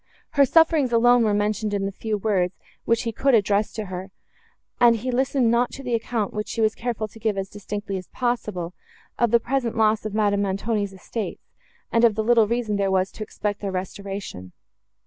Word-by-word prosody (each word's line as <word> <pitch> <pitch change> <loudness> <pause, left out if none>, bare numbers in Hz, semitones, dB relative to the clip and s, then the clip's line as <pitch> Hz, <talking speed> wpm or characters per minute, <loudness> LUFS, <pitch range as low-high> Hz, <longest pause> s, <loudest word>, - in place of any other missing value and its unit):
Her 280 -2 +5
sufferings 315 -2 +4
alone 240 +1 +5
were 215 - +2
mentioned 210 0 0
in 195 -1 -1
the 195 - -2
few 215 +2 -3
words, 190 -4 0 0.3
which 230 +1 +2
he 230 - -2
could 265 +3 +2
address 205 -1 +2
to 215 - -4
her, 185 0 -6 0.7
and 240 -1 +6
he 250 +3 -3
listened 255 -1 +2
not 240 +1 +2
to 275 - -8
the 250 -2 -3
account, 225 -2 -1
which 210 0 -3
she - - -5
was 220 -1 +3
careful 230 -2 -3
to 225 - -15
give 215 -2 -1
as 195 0 -3
distinctly 205 -1 -5
as 185 - -8
possible, 210 -8 -2 0.5
of 235 - +3
the 235 +2 +5
present 240 -1 -2
loss 215 -1 +3
of 215 -1 -4
Madame 205 -2 +2
Montoni's 200 +1 -1
estates, 205 +3 -5 0.5
and 230 - +3
of 225 -3 +5
the 220 - 0
little 230 -1 +4
reason 230 -2 -1
there 200 -1 +1
was 190 0 +1
to - - -12
expect 210 -1 -3
their 200 -2 -2
restoration. 190 - -6
215 Hz, 205 wpm, -24 LUFS, 200-235 Hz, 0.7 s, and